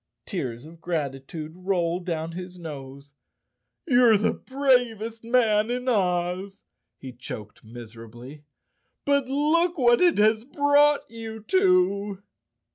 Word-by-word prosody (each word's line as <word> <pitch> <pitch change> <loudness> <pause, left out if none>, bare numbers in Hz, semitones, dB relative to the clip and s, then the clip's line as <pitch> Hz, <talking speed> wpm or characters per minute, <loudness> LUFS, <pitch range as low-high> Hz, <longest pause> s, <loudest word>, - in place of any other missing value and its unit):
Tears 130 - -5
of 165 +1 -14
gratitude 150 -1 -4
rolled 180 -1 -2
down 165 -1 -3
his 180 +1 -8
nose. 140 -4 -9 0.7
"You're 245 -4 +5
the 210 - +1
bravest 245 -5 0
man 225 -2 +2
in 250 +1 -3
Oz," 185 -2 -1 0.3
he 130 - -9
choked 110 -4 -9
miserably, 120 +4 -11 0.6
"but 280 -2 +2
look 330 +5 +1
what 240 -1 +4
it 350 -2 +4
has 215 +1 +3
brought 285 +2 +3
you 225 -1 -8
to?" 360 - +2
200 Hz, 115 wpm, -25 LUFS, 155-250 Hz, 0.7 s, You're